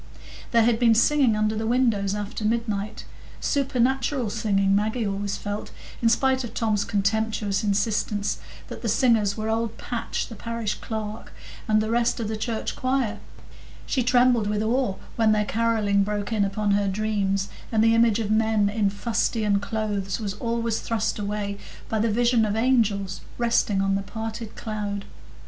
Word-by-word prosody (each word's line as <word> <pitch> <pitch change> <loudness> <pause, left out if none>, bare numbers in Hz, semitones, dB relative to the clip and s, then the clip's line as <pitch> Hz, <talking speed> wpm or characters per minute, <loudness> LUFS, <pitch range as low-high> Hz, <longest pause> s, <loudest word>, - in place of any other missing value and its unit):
There 230 -1 +4
had 230 0 +2
been 230 -2 +5
singing 260 -1 +4
under 215 0 +1
the 220 +1 -2
windows 225 -5 +2
after 210 +2 -5
midnight,—supernatural 235 +4 -1
singing, 195 -3 +2
Maggie 220 +3 0
always 200 0 -2
felt, 205 0 -5 0.3
in 230 - +4
spite 260 +2 +2
of 235 - -7
Tom's 215 -3 +1
contemptuous 210 0 0
insistence 210 0 0 0.3
that - - -8
the 230 - -1
singers 220 -3 +3
were 215 0 -3
old 225 0 -1
Patch, 240 -2 -3
the - - -9
parish 230 0 -3
clerk, 215 -1 -5 0.3
and 215 -1 +3
the 215 +1 -2
rest 240 +1 +1
of 225 - -2
the 220 - -2
church 220 +1 -3
choir; 255 -4 -1 0.7
she 260 - 0
trembled 245 -2 +3
with 210 0 0
awe 235 -2 +1 0.2
when 220 -2 +4
their 210 0 +1
carolling 220 -3 +1
broke 205 +2 -2
in 210 -2 +2
upon 205 +1 -1
her 200 0 +2
dreams, 195 -1 0 0.2
and 220 -1 +3
the 225 0 +5
image 230 -2 +4
of 215 -2 -2
men 220 -2 +3
in 205 -1 +1
fustian 210 0 0
clothes 205 -2 -2
was 205 -3 -3
always 230 +1 -1
thrust 230 -1 -1
away 200 -1 -3 0.3
by 220 - 0
the 225 +2 +2
vision 235 +1 +3
of 210 -1 0
angels 220 -6 +1 0.2
resting 230 -4 +2
on 195 0 +1
the 195 - 0
parted 220 +2 -6
cloud. 205 -2 -4
220 Hz, 165 wpm, -25 LUFS, 205-230 Hz, 0.7 s, been